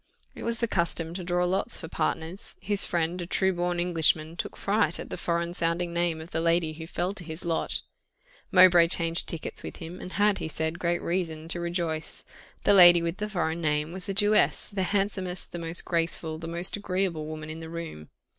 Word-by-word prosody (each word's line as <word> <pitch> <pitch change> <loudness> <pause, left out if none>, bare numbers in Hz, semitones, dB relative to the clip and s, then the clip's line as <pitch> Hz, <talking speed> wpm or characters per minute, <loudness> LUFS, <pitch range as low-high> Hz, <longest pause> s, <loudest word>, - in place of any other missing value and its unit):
It - - -10
was 230 0 -1
the 235 - 0
custom 170 -3 -1
to 180 0 -5
draw 175 0 +1
lots 185 +2 +1
for 160 - -7
partners. 165 +3 -3
His 205 -1 +3
friend, 170 +1 -1
a 175 - -5
true 190 +1 +2
born 175 0 -1
Englishman, 165 -2 +3
took - - -5
fright 195 -5 +1
at - - -7
the - - -2
foreign 170 0 -1
sounding 170 0 -1
name 170 -2 0
of 160 - -11
the 165 - -1
lady 165 -1 +2
who 160 +1 -8
fell 180 +3 -2
to 200 - -8
his 160 +1 -7
lot 165 -1 -1 0.7
Mowbray 180 -2 +7
changed 165 -1 +1
tickets 165 - -5
with - - -7
him, 170 +3 -9
and 185 - -8
had, 205 0 +2
he - - -3
said, 160 +2 -3
great 175 0 0
reason 165 -3 -2
to 175 - -2
rejoice. 170 -2 -3 0.4
The - - +5
lady 175 -3 +9
with 170 +2 -2
the 210 0 -3
foreign 170 -4 -1
name 150 0 0
was 190 +2 -2
a - - 0
Jewess, 210 +1 +3
the 200 -2 -3
handsomest, 195 -3 -1
the 175 - -5
most 165 +1 -4
graceful, 165 -2 0
the 165 - -6
most 170 +2 -1
agreeable 185 -6 -2
woman 155 0 -6
in 160 - -7
the 160 0 -8
room. 165 - -7
170 Hz, 210 wpm, -27 LUFS, 165-185 Hz, 0.7 s, lady